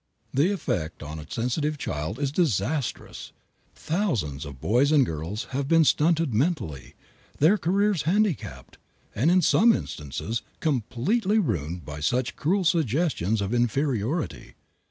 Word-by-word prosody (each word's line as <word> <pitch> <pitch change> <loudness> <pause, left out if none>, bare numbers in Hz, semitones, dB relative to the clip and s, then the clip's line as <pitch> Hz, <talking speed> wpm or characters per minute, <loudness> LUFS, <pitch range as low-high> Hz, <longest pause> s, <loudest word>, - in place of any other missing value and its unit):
The 150 +9 +3
effect 85 - -3
on 75 +1 -7
a 75 - -11
sensitive 145 +6 -1
child 80 - -4
is 140 -1 -1
disastrous. 140 - -2 0.4
Thousands 115 - -2
of 70 -3 -9
boys 125 - +2
and 145 -4 +5
girls 80 +5 -4
have 135 +1 -2
been 165 +1 +5
stunted 160 -2 +2
mentally, 110 - -1 0.4
their 160 +8 +5
careers 195 -1 +1
handicapped, 170 - -1 0.3
and 135 +10 +2
in 180 0 +4
some 230 +9 +5
instances 105 - -3 0.2
completely 160 - 0
ruined 85 - -1
by 75 +1 -7
such 125 +11 0
cruel 185 +6 +1
suggestions 145 - +1
of 100 +3 -2
inferiority. 120 - -1
130 Hz, 130 wpm, -26 LUFS, -, 0.4 s, and